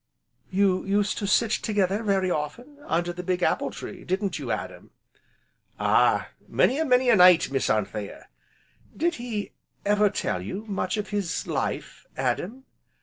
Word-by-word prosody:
"You 190 -1 +2
used 200 +1 0
to 200 - -2
sit 220 +2 +3
together 205 -2 0
very 195 -4 +1
often 235 - -4
under 175 +1 0
the 180 - -6
big 180 0 -1
apple - - +1
tree, - - -8
didn't 195 +2 -2
you, - - -6
Adam?" - - -4 0.9
"Ah! - - +3 0.2
many 270 - +2
an' 320 -3 0
many 250 0 +4
a - - +6
night, 180 -6 +6
Miss 135 - 0
Anthea." 105 -1 -2 0.7
"Did 340 +3 +1
he 220 -4 -4 0.3
ever 210 0 +4
tell 90 - -2
you 190 - -6
much 195 -1 -2
of 210 0 -3
his 200 -4 -2
life, - - -4
Adam?" 175 - -2
195 Hz, 150 wpm, -26 LUFS, 180-215 Hz, 0.9 s, a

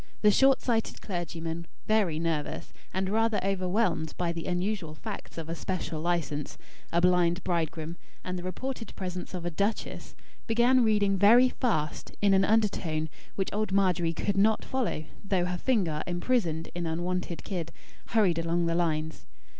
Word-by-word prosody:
The 210 - +7
short 270 +5 +5
sighted 230 -3 0
clergyman, 170 -2 -4 0.2
very 210 -8 +2
nervous, 160 -2 -2 0.2
and 190 0 -1
rather 220 +2 +2
overwhelmed 185 -3 0
by 175 -1 0
the 170 -1 -5
unusual 180 -3 -1
facts - - -7
of 165 -1 -5
a 165 - -3
special 165 -2 -3
license, 160 -4 -1 0.3
a 170 - +3
blind 180 0 +3
bridegroom, 165 -1 -2 0.3
and 180 - -3
the 180 - -4
reported 225 +7 -5
presence 180 -1 -5
of 175 -1 -5
a 175 - -1
duchess, 200 +6 -2 0.3
began 240 +2 +4
reading 205 -3 +3
very 235 +6 +7
fast, 160 - -2
in 200 -1 +4
an 195 0 +5
undertone, 180 -8 +1 0.3
which 195 - -2
old 215 -1 -1
Margery 185 -4 +2
could 195 +4 -1
not 215 +2 +3
follow, 245 -12 -1 0.2
though 190 -3 +1
her 180 0 -2
finger, 185 -12 +1
imprisoned 175 -3 0
in 175 -1 -3
unwonted 175 +1 -2
kid, 170 -4 -4 0.4
hurried 195 -7 +3
along 170 +1 +1
the 165 - +1
lines. 160 -2 -1
180 Hz, 155 wpm, -29 LUFS, 165-210 Hz, 0.4 s, The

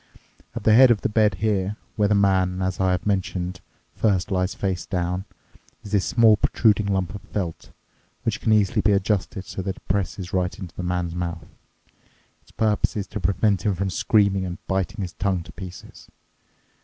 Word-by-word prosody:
At - - -5
the 110 - +5
head 130 +3 +8
of 115 -4 +3
the - - 0
bed 105 -2 +3
here, 100 0 0 0.2
where 105 -3 +2
the 105 - +2
man, 95 -2 +2
as 95 0 -2
I 95 -1 +2
have 90 -1 -1
mentioned, 90 -2 -2 0.3
first 100 -4 +1
lies 90 0 0
face 95 -4 -2
down, 90 +1 -2 0.6
is 100 - -10
this 100 -3 +2
small 110 -2 +5
protruding 105 -1 +2
lump 95 -3 -1
of 100 - -7
felt, 90 -6 -5 0.5
which - - -1
can 110 - +1
easily 105 -3 +3
be 105 0 +3
adjusted 100 -1 -1
so 95 - -5
that 95 0 -3
it - - -20
presses 95 -1 -2
right 90 -1 0
into 95 -4 -9
the - - -5
man's 90 -1 -2
mouth. 85 -2 -4 1.0
Its - - -27
purpose 110 -2 0
is 100 - -2
to - - -4
prevent 100 +1 +1
him 95 -1 0
screaming 100 -1 +2
and 90 -1 -4
biting 95 +2 -2
his 90 - -6
tongue 95 -3 -1
to - - -12
pieces. 95 -2 -11
95 Hz, 185 wpm, -24 LUFS, 90-105 Hz, 1.0 s, head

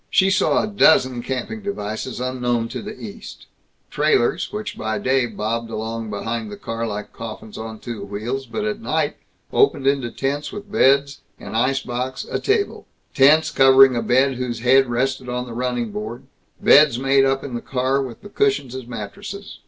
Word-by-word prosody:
She 190 0 +3
saw 185 - +2
a - - -2
dozen 130 - +4
camping 130 - -4
devices 125 - -4
unknown 125 -2 -1
to - - -5
the 210 +1 -8
East: 215 0 -9 0.5
trailers, 415 - +1
which 210 0 -5
by 110 0 -2
day 130 -1 +1
bobbed 115 +2 -3
along 110 0 -4
behind 110 +1 -4
the 105 - -7
car 115 0 -4
like 105 -1 -6
coffins 110 -1 -8
on 110 0 -6
two 115 -3 -7
wheels, 110 +7 -4
but 215 -1 -3
at 215 0 -2
night - - -1 0.4
opened 415 - +3
into 135 -3 +1
tents 140 +4 -3
with 205 0 -9
beds, 140 -7 +3 0.2
an - - -9
ice 130 +4 +1
box, 125 +1 -4
a - - -1
table; 415 0 -1 0.3
tents 150 +4 +5
covering 135 -1 +6
a 120 - 0
bed 130 +2 +2
whose 120 -2 -3
head 130 +2 +5
rested 130 +1 -1
on 125 0 -2
the 120 - -8
running 120 -2 -2
board; 110 +4 -6 0.4
beds 145 -5 +6
made 135 +1 +3
up 135 0 +1
in 140 - -6
the 120 - -3
car, 130 +1 0
with 125 -4 -7
the 205 - -10
cushions 205 - 0
as 130 -2 -7
mattresses. 195 - -8
130 Hz, 180 wpm, -21 LUFS, 115-140 Hz, 0.5 s, covering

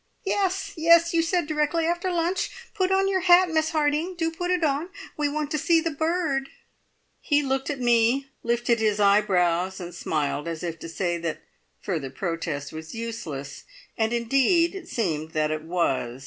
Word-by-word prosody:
"Yes! 390 0 0
Yes! 335 +1 +5
You 335 - +4
said 340 0 0
directly 305 +2 0
after 345 +2 0
lunch. 345 +2 0 0.2
Put 380 -3 0
on 385 0 +3
your 385 -1 +1
hat, 360 0 +5
Miss 315 0 +1
Harding 310 +3 0
do 330 -1 -1
put 355 +2 -4
it 360 -2 +1
on! 300 +3 0 0.3
We 295 -1 0
want 295 0 -3
to 305 - 0
see 335 +2 +3
the 330 0 -2
bird." 315 -3 -1 0.7
He 290 -1 +1
looked 270 0 -1
at 285 -3 -3
me, 240 +2 +3 0.2
lifted 235 0 +1
his 215 -1 +1
eyebrows, 190 -3 +2
and 175 -1 -7
smiled 150 -2 -2
as 165 -1 -5
if 165 -2 -4
to 165 - -8
say 175 +1 -2
that 165 -2 -4 0.4
further 160 -9 -3
protest 160 -1 -4
was 160 +3 -8
useless, 195 -12 -6 0.3
and 220 -1 0
indeed 275 - +2
it 380 -3 -8
seemed 160 -8 -2
that 155 0 +1
it 155 0 -2
was. 145 -7 -1
270 Hz, 175 wpm, -25 LUFS, -, 0.7 s, Yes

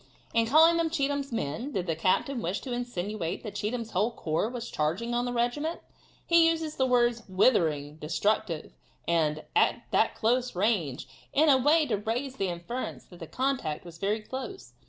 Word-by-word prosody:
In 230 -1 +3
calling 320 +6 +6
them 335 -1 +1
Cheatham's 285 -3 -1
men, 230 - -3
did 185 -3 -1
the 165 -3 -1
captain 215 - +1
wish 180 +2 -2
to 260 - -6
insinuate 215 -7 -3
that 210 - -6
Cheatham's 230 +1 -3
whole 205 +5 +2
corps 165 -2 -1
was 240 -1 -6
charging 175 +11 -1
on 240 +1 +1
the 245 - -2
regiment? 245 +7 -1 0.5
He 335 -1 +5
uses 320 -2 -2
the 260 - +1
words 240 -2 +3
"withering," 160 - +2
"destructive," 170 +1 -1 0.3
and 155 -2 +1
"that 435 - +2
close 245 +1 +1
range," 180 - 0 0.3
in 305 +2 +4
a 270 - +7
way 305 +4 +4
to 225 -7 0
raise 245 +6 -3
the 195 - 0
inference 175 +9 -5
that 175 - -14
the 165 - -7
contact 250 - -2
was 165 -1 -11
very 210 +2 0
close. 265 - -7
230 Hz, 175 wpm, -28 LUFS, 180-265 Hz, 0.5 s, a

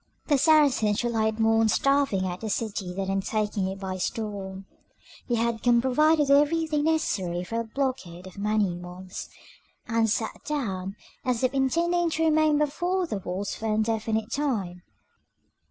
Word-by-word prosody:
The 290 - +5
Saracens 275 -9 +4
relied 220 -2 0
more 225 0 +3
on 225 - +3
starving 275 -8 +2
out 180 0 -4
the 220 - -3
city 200 -4 -2
than 190 +1 -3
on 195 0 0
taking 210 -1 -1
it 190 +1 -5
by 190 -1 -4
storm: 195 -1 -4 0.6
they 240 - +2
had 230 0 0
come 240 -1 +4
provided 305 +6 +3
with 280 -1 +2
everything 300 +1 +3
necessary 190 - 0
for 230 +5 -3
a 230 - -3
blockade 225 -8 -3
of 185 - -11
many 210 -2 +1
months, 180 +1 -8 0.6
and 230 -1 +2
sat 220 +1 -2
down 195 -10 -3 0.3
as 250 -1 -1
if 255 +1 +2
intending 335 +6 +1
to 325 0 -1
remain 310 -1 +3
before 350 +5 0
the 210 - -3
walls 190 +2 -4
for 225 - -4
an 215 - +1
indefinite 220 0 -1
time. 210 -12 -2
225 Hz, 165 wpm, -26 LUFS, 195-285 Hz, 0.6 s, The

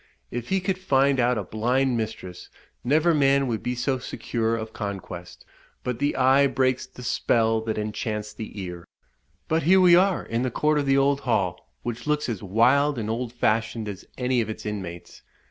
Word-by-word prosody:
If 120 0 -5
he 190 0 +1
could 185 0 -1
find 140 -6 +2
out 125 0 +2
a 105 - -2
blind 125 +6 0
mistress, 105 -6 -5 0.3
never 155 +6 +3
man 140 -2 +3
would 115 -4 -2
be 125 - -2
so 130 +2 -1
secure 115 -2 -2
of 110 -1 -6
conquest; 95 -4 -7 0.4
but 125 -2 -3
the 145 +1 0
eye 135 +2 +5
breaks 130 -1 0
the 125 - -12
spell 115 -2 +1
that 110 -1 -2
enchants 105 0 -3
the 110 -1 -8
ear. 90 -2 -7 0.6
But 160 +1 +1
here 185 +5 +5
we 180 -2 +7
are 185 0 +3
in 115 +1 -2
the 130 - 0
court 150 +5 +1
of 140 - -2
the 135 0 +4
old 140 0 +3
hall, 95 - -1
which 120 +3 -5
looks 150 0 +1
as 110 -5 -3
wild 125 +8 +3
and 110 -1 -2
old 120 +1 -3
fashioned 110 -2 0
as 100 -2 -6
any 125 -1 +1
of 110 - -4
its 110 - -6
inmates. 95 -5 -6
120 Hz, 190 wpm, -25 LUFS, 110-140 Hz, 0.6 s, we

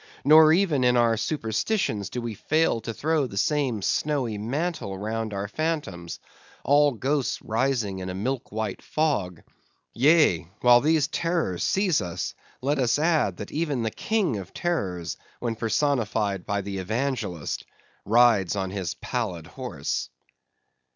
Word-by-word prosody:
Nor 155 +2 +8
even 160 -6 +3
in 125 0 +4
our 115 -1 +4
superstitions 110 - -1
do 125 +2 -4
we 115 -1 -3
fail 155 +2 +1
to 115 - -4
throw 150 +4 0
the 100 - -9
same 130 -4 0
snowy 135 -5 0
mantle 125 - -3
round 110 +2 -3
our 100 0 -3
phantoms; 105 - -3 0.4
all 145 0 +4
ghosts 135 +3 -1
rising 115 -4 0
in 95 0 -5
a 90 - -4
milk 125 +6 -3
white 110 -2 -3
fog—Yea, 130 - 0
while 120 0 +7
these 155 -1 +3
terrors 165 - -1
seize 190 - +2
us, 85 -2 -4 0.3
let 140 +2 0
us 125 -1 +2
add, 150 - +1
that 105 - -7
even 150 -6 -1
the 110 - -1
king 210 - 0
of 95 -2 -9
terrors, 90 - -2 0.2
when 115 -2 -2
personified 110 -5 0
by 100 0 0
the 100 0 -5
evangelist, 110 - -2 0.4
rides 110 -4 +4
on 95 -2 -2
his 95 -4 -3
pallid 100 -10 -3
horse. 90 - -4
120 Hz, 140 wpm, -25 LUFS, 100-150 Hz, 0.4 s, Nor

